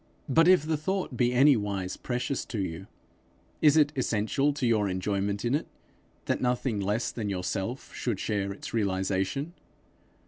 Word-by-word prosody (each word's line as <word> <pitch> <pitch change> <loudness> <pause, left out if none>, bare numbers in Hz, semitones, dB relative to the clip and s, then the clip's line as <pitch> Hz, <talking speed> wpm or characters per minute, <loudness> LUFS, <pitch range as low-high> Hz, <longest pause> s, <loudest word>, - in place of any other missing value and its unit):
But 165 +5 +4
if 180 -5 +5
the 160 -1 0
thought 185 -2 -2
be 120 0 +2
anywise 105 -8 +2
precious 125 +2 -2
to 115 - -5
you, 95 0 -4 0.7
is 150 0 +6
it 145 -1 +4
essential 130 +3 +1
to 140 -3 -2
your 110 -4 +2
enjoyment 100 +2 -1
in 120 - +1
it, 150 - 0 0.6
that - - -1
nothing 125 -3 0
less 105 +4 -1
than 110 -3 -4
yourself 95 +6 -3
should 115 -6 -2
share 100 -2 -1
its 100 - -8
realization? 100 - -1
115 Hz, 150 wpm, -28 LUFS, 100-140 Hz, 0.7 s, is